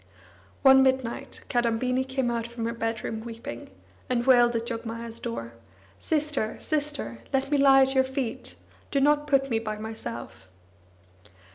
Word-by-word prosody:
One 265 Hz, 0 st, +8 dB
midnight, 260 Hz, -3 st, 0 dB
Kadambini 245 Hz, +2 st, +1 dB
came 260 Hz, -2 st, -1 dB
out 235 Hz, -1 st, -2 dB
from 235 Hz, -1 st, -5 dB
her 230 Hz, -, -1 dB
bedroom 225 Hz, -1 st, -3 dB
weeping, 225 Hz, -, -8 dB, 0.4 s
and 245 Hz, -1 st, +1 dB
wailed 240 Hz, -2 st, +5 dB
at 230 Hz, 0 st, -1 dB
Jogmaya's 230 Hz, 0 st, -5 dB
door: 115 Hz, 0 st, -5 dB, 0.5 s
"Sister, 300 Hz, -8 st, -1 dB
sister, 290 Hz, -, -3 dB
let 270 Hz, +1 st, 0 dB
me 290 Hz, -, +3 dB
lie 270 Hz, -1 st, +7 dB
at 265 Hz, 0 st, +1 dB
your 265 Hz, -1 st, +4 dB
feet! 260 Hz, -3 st, -4 dB, 0.3 s
Do 280 Hz, -, +1 dB
not 295 Hz, +1 st, +3 dB
put 275 Hz, -2 st, +2 dB
me 225 Hz, -, +2 dB
by 215 Hz, -1 st, -4 dB
myself!" 120 Hz, -, -7 dB
240 Hz, 145 wpm, -27 LUFS, 225-270 Hz, 0.5 s, One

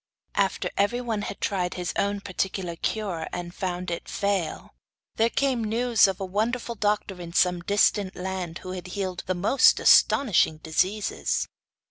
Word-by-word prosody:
After 195 Hz, -1 st, 0 dB
everyone 225 Hz, +1 st, 0 dB
had 200 Hz, -, -6 dB
tried 180 Hz, -3 st, -1 dB
his 180 Hz, -1 st, -3 dB
own 200 Hz, 0 st, 0 dB
particular 185 Hz, -2 st, -3 dB
cure, 185 Hz, -4 st, -3 dB
and 175 Hz, 0 st, -5 dB
found 180 Hz, -1 st, -3 dB
it 170 Hz, -, -5 dB
fail, 200 Hz, -4 st, -2 dB, 0.4 s
there 225 Hz, +1 st, +3 dB
came 260 Hz, -2 st, 0 dB
news 230 Hz, 0 st, +3 dB
of 190 Hz, -1 st, -3 dB
a 195 Hz, -, -2 dB
wonderful 230 Hz, +5 st, -1 dB
doctor 205 Hz, -3 st, -1 dB
in 170 Hz, -1 st, -8 dB
some 180 Hz, 0 st, +3 dB
distant 200 Hz, 0 st, +2 dB
land 180 Hz, -2 st, -4 dB
who 185 Hz, -, -6 dB
had 185 Hz, 0 st, -6 dB
healed 185 Hz, -2 st, -2 dB
the 185 Hz, -, 0 dB
most 200 Hz, +10 st, +4 dB
astonishing 210 Hz, -, +4 dB
diseases. 185 Hz, +7 st, -1 dB
195 Hz, 150 wpm, -26 LUFS, 180-210 Hz, 0.4 s, most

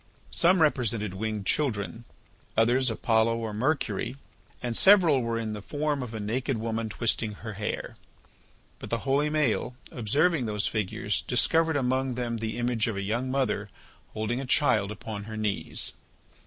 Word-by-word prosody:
Some 175 Hz, 0 st, +4 dB
represented 115 Hz, -9 st, +1 dB
winged 105 Hz, 0 st, -3 dB
children, 115 Hz, -4 st, -1 dB, 0.5 s
others 120 Hz, +3 st, +4 dB
Apollo 115 Hz, 0 st, +2 dB
or 110 Hz, -2 st, -4 dB
Mercury, 125 Hz, -1 st, -1 dB, 0.4 s
and 120 Hz, -2 st, -3 dB
several 175 Hz, -, +6 dB
were 115 Hz, -1 st, -1 dB
in 110 Hz, -1 st, -3 dB
the 105 Hz, -, -6 dB
form 145 Hz, +4 st, -1 dB
of 115 Hz, -3 st, -6 dB
a -, -, -4 dB
naked 120 Hz, +5 st, -1 dB
woman 115 Hz, 0 st, -2 dB
twisting 110 Hz, 0 st, 0 dB
her 110 Hz, +2 st, -7 dB
hair. 105 Hz, +2 st, -4 dB, 0.8 s
But -, -, -8 dB
the 115 Hz, -, +1 dB
holy 140 Hz, +2 st, +2 dB
Maël, 145 Hz, -5 st, 0 dB, 0.2 s
observing 140 Hz, -, +1 dB
those 105 Hz, -1 st, 0 dB
figures, 105 Hz, -4 st, -1 dB
discovered 165 Hz, -1 st, +2 dB
among 130 Hz, -1 st, 0 dB
them 120 Hz, -1 st, -2 dB
the 110 Hz, +1 st, -3 dB
image 120 Hz, -2 st, 0 dB
of 110 Hz, -3 st, -2 dB
a 100 Hz, -, -2 dB
young 120 Hz, +6 st, -1 dB
mother 125 Hz, -6 st, 0 dB, 0.5 s
holding 115 Hz, +4 st, -1 dB
a 135 Hz, -, -6 dB
child 110 Hz, -7 st, +3 dB
upon 105 Hz, -1 st, -6 dB
her 110 Hz, 0 st, -6 dB
knees. 105 Hz, -2 st, -1 dB
115 Hz, 155 wpm, -28 LUFS, 110-135 Hz, 0.8 s, several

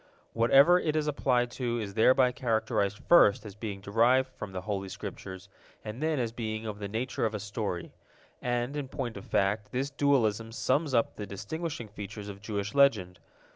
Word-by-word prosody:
Whatever 135 Hz, +9 st, +6 dB
it 155 Hz, -3 st, -1 dB
is 155 Hz, -1 st, +1 dB
applied 125 Hz, -4 st, +1 dB
to 120 Hz, -2 st, -2 dB
is 100 Hz, -3 st, -5 dB
thereby 125 Hz, +4 st, +4 dB
characterized 110 Hz, -4 st, 0 dB
first 110 Hz, -12 st, +6 dB
as 105 Hz, -, -8 dB
being 105 Hz, -1 st, -6 dB
derived 120 Hz, +6 st, +3 dB
from 100 Hz, -, -8 dB
the 95 Hz, -1 st, -5 dB
Holy 100 Hz, -1 st, -3 dB
Scriptures, 95 Hz, -2 st, -8 dB, 0.4 s
and 110 Hz, +5 st, -6 dB
then 155 Hz, -1 st, +1 dB
as 120 Hz, -3 st, -1 dB
being 110 Hz, -1 st, -4 dB
of 105 Hz, -2 st, -5 dB
the 100 Hz, -, -4 dB
nature 115 Hz, +5 st, -3 dB
of 110 Hz, -1 st, 0 dB
a -, -, -3 dB
story. 100 Hz, -4 st, -4 dB, 0.5 s
And, 120 Hz, +2 st, -1 dB
in 145 Hz, -2 st, -3 dB
point 125 Hz, -3 st, -4 dB
of 100 Hz, -, -9 dB
fact, 105 Hz, +1 st, 0 dB
this 135 Hz, +3 st, -2 dB
dualism 115 Hz, -6 st, +1 dB
sums 135 Hz, +3 st, 0 dB
up 115 Hz, -, +1 dB
the 105 Hz, -, -5 dB
distinguishing 120 Hz, -, -5 dB
features 105 Hz, 0 st, -8 dB
of 100 Hz, 0 st, -9 dB
Jewish 100 Hz, -2 st, -3 dB
Legend. 110 Hz, -11 st, +3 dB
115 Hz, 180 wpm, -29 LUFS, 100-130 Hz, 0.5 s, Whatever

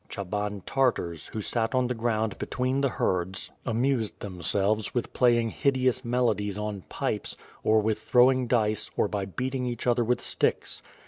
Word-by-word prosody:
Ohaban 105 Hz, 0 st, -3 dB
Tartars, 120 Hz, -, 0 dB
who 110 Hz, -, -5 dB
sat 115 Hz, +2 st, 0 dB
upon 130 Hz, -1 st, +3 dB
the 125 Hz, -, 0 dB
ground 110 Hz, -2 st, -1 dB
between 130 Hz, +2 st, -1 dB
the 140 Hz, -, +2 dB
herds 95 Hz, -4 st, -1 dB, 0.2 s
amused 115 Hz, -1 st, 0 dB
themselves 100 Hz, +5 st, -1 dB
with 120 Hz, -, -2 dB
playing 120 Hz, -2 st, +3 dB
hideous 130 Hz, -2 st, +1 dB
melodies 110 Hz, -5 st, 0 dB
on 105 Hz, -2 st, -3 dB
pipes, -, -, -3 dB, 0.3 s
or 110 Hz, 0 st, +4 dB
with 110 Hz, 0 st, 0 dB
throwing 130 Hz, 0 st, +4 dB
dice, 110 Hz, -3 st, +1 dB
or -, -, +3 dB
by 100 Hz, -2 st, -2 dB
beating 125 Hz, +6 st, -3 dB
each 120 Hz, -2 st, -4 dB
other 120 Hz, -1 st, +3 dB
with 125 Hz, +2 st, +1 dB
sticks. -, -, 0 dB
115 Hz, 155 wpm, -27 LUFS, 105-125 Hz, 0.3 s, or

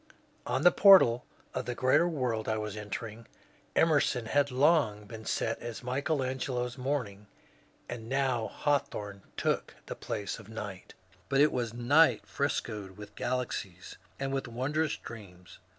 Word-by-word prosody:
On 130 Hz, +3 st, 0 dB
the 180 Hz, -, +8 dB
portal 185 Hz, -, +7 dB, 0.3 s
of -, -, -3 dB
the 125 Hz, -, -3 dB
greater 140 Hz, +7 st, +3 dB
world 125 Hz, -8 st, -2 dB
I 110 Hz, -, +1 dB
was 105 Hz, -1 st, -4 dB
entering 110 Hz, +2 st, -6 dB, 0.5 s
Emerson 145 Hz, -6 st, +3 dB
had 140 Hz, +4 st, +2 dB
long 130 Hz, -6 st, +2 dB
been 110 Hz, 0 st, -9 dB
set 115 Hz, -, -1 dB
as 120 Hz, 0 st, -7 dB
Michael 135 Hz, +3 st, -1 dB
Angelo's 130 Hz, -1 st, -2 dB
^^ -, -, -21 dB
Morning," 120 Hz, -7 st, -3 dB, 0.6 s
and 115 Hz, -2 st, -7 dB
now 130 Hz, -5 st, 0 dB
ELawthorne 105 Hz, -8 st, -1 dB, 0.2 s
took -, -, -1 dB
the -, -, -5 dB
place 100 Hz, 0 st, -4 dB
of 105 Hz, -, -13 dB
*^ -, -, -16 dB
Night." 105 Hz, -4 st, -7 dB, 0.3 s
But 135 Hz, -, +2 dB
it 150 Hz, +1 st, +6 dB
was 115 Hz, -2 st, -2 dB
Night 145 Hz, +7 st, +4 dB
frescoed 105 Hz, -8 st, -3 dB
with 105 Hz, 0 st, -10 dB
galaxies 110 Hz, -8 st, -4 dB, 0.2 s
and 135 Hz, 0 st, -2 dB
with 135 Hz, -1 st, -2 dB
wondrous 145 Hz, +6 st, -1 dB
dreams. 90 Hz, -6 st, -12 dB
120 Hz, 150 wpm, -30 LUFS, 110-135 Hz, 0.6 s, the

